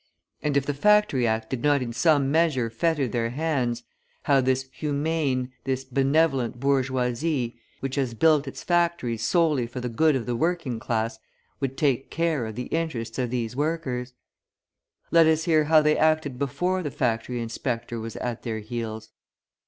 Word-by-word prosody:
And 145 -1 +1
if 140 - +1
the 145 - -1
Factory 205 - +3
Act 110 0 -1
did 130 -3 -2
not 145 -1 +3
in 120 -1 -5
some 140 0 +3
measure 150 -8 +2
fetter 145 +3 +1
their 115 0 -1
hands, 125 -4 -1 0.4
how 140 -2 +4
this 130 +1 0
"humane," 145 -4 -1
this 130 0 -1
"benevolent" 135 -2 +1
bourgeoisie, 130 -1 0 0.2
which 135 +1 -3
has 130 -4 -1
built 155 +1 +3
its 135 - -7
factories 170 -10 +1
solely 150 -4 +2
for 120 +2 -6
the 125 0 -3
good 155 +6 +3
of 125 -4 -2
the 120 - -2
working 155 -4 -1
class, 110 -1 -2 0.4
would 135 -1 -3
take 135 -4 +1
care 160 -7 0
of 110 - -7
the 125 +1 -4
interests 130 -9 -2
of 125 -2 0
these 120 -1 -3
workers! 135 -5 -2 1.0
Let 165 -1 +6
us 160 0 +3
hear 155 -2 +3
how 155 0 +5
they 150 0 +4
acted 155 -5 +1
before 180 +7 0
the 150 - -3
factory 120 -1 -1
inspector 115 0 -3
was 115 0 -6
at 120 -2 -4
their 115 -3 -3
heels. 110 0 -5
135 Hz, 170 wpm, -25 LUFS, 120-155 Hz, 1.0 s, Let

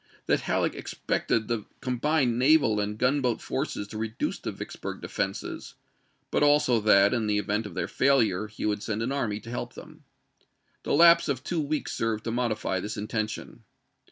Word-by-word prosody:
that - - +2
Halleck - - 0
expected 110 -2 -2
the 115 -3 -2
combined 125 -1 +1
naval 130 -6 +4
and 105 0 -2
gun 130 +5 +2
boat 125 -3 0
forces 130 -7 -3
to 110 - -6
reduce 110 +1 -3
the - - -4
Vicksburg - - -7
defenses, - - -4 0.6
but - - +1
also 145 -5 +4
that, 105 -1 +5
in 115 -3 0
the 105 -1 +1
event 105 +1 -1
of 90 - -11
their 90 -2 -1
failure, 110 -7 +2
he 110 - -6
would 105 -1 0
send 110 0 -2
an 125 - -2
army 115 -7 -1
to 115 - -9
help 120 - -4
them. - - -13 0.8
The - - -2
lapse 170 0 +6
of 130 -2 -1
two 165 +1 -1
weeks 150 +1 -2
served 115 -1 -1
to 115 - -3
modify 110 -5 -1
this 105 +4 -5
intention. 110 +1 -4
115 Hz, 180 wpm, -27 LUFS, 105-135 Hz, 0.8 s, lapse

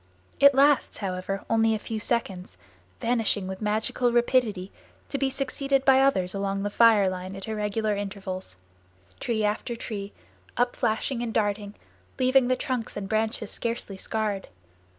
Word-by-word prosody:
It 280 -1 +7
lasts, 280 0 +4
however, 195 0 -4
only 225 0 +3
a - - -1
few 220 +1 -5
seconds, 200 -5 -3 0.4
vanishing 225 -5 0
with 190 +1 -6
magical 220 +3 0
rapidity, 235 -5 +1 0.4
to 275 - -2
be 270 0 +1
succeeded 275 0 -1
by 265 0 +6
others 190 -10 +2
along 195 0 -2
the 205 - -2
fire 220 -3 +5
line 185 +1 -4
at 195 +1 -7
irregular 215 0 -1
intervals, 190 - -5 0.6
tree 220 -2 -1
after 215 +3 -1
tree, 205 -3 -6 0.5
upflashing 245 0 0
and 235 -1 -2
darting, 205 -1 -1 0.4
leaving 260 0 +4
the 255 - +2
trunks 255 -5 -3
and 200 -1 -4
branches 220 -1 -1
scarcely 230 -4 -2
scarred. 205 0 -2
220 Hz, 145 wpm, -26 LUFS, 200-245 Hz, 0.6 s, It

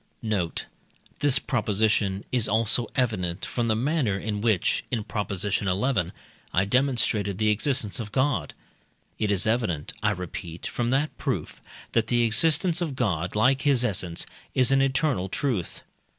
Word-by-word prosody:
Note. 100 -7 -1 0.5
This 145 -2 +4
proposition 105 -5 0
is 120 -3 +1
also 115 +2 +3
evident 95 -9 -1
from 120 -2 -2
the 110 - +2
manner 125 -4 0
in 105 +1 -3
which 110 -5 +1
(in 115 -4 -1
Prop. 105 0 -3
xi.) 100 +1 -1 0.8
I 95 +2 +2
demonstrated 105 -5 +1
the 110 0 +2
existence 110 -1 0
of 105 -3 -5
God; 130 - 0 0.6
it 105 - 0
is 100 -3 +2
evident, 110 -10 0
I 105 - +2
repeat, 90 -3 -6
from 120 -1 -2
that 140 +4 0
proof, - - -3 0.3
that 115 -1 +1
the 120 0 +2
existence 160 - +3
of 155 -6 -2
God, 90 -8 -1
like 130 +5 +3
his 135 -4 +3
essence, 90 -6 0 0.3
is 130 0 +4
an 135 0 +4
eternal 135 - +1
truth. 115 -7 -2
110 Hz, 150 wpm, -26 LUFS, 100-130 Hz, 0.8 s, This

